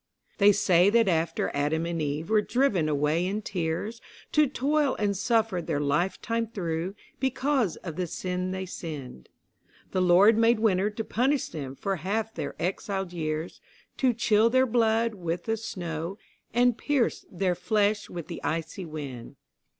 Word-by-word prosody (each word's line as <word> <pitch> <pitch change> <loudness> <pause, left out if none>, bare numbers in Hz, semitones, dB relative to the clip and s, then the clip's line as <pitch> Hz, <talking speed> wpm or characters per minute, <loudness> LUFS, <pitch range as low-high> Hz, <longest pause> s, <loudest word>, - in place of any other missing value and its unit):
They 205 0 +7
say 185 -2 +4
that 230 0 +4
after 165 -2 0
Adam 150 +3 0
and 170 -1 -2
Eve 150 +6 -3
were 215 -1 +5
driven 210 - +1
away 150 +3 +1
in 200 +4 -2
tears 185 +6 -3 0.3
To 305 -1 +4
toil 285 +2 +1
and 205 -1 0
suffer 215 -2 +1
their 160 -3 -2
life 145 +6 0
time 230 0 -1
through, 180 -3 -3 0.2
because 265 - +1
of 165 -4 -6
the 180 -1 -1
sin 180 +2 -3
they 190 0 -3
sinned, 145 - -8 0.6
The 185 - +1
Lord 190 +5 +6
made 230 0 +4
Winter 205 -2 +2
to 215 +1 -4
punish 265 +5 0
them 140 -4 -6
for 195 +6 -2
half 215 +6 -2
their - - -5
exiled 190 +1 -3
years, 155 0 -3 0.4
To 260 -2 +3
chill 225 -1 +3
their 260 +2 +4
blood 230 -1 +2
with 175 -3 -3
the 225 - +1
snow, 175 -4 -5 0.3
and 245 0 +3
pierce 285 -5 0
their 185 0 0
flesh 210 +2 0
with 170 -3 -6
the - - -7
icy 165 +3 -3
wind. 140 -5 -7
190 Hz, 160 wpm, -27 LUFS, 165-225 Hz, 0.6 s, They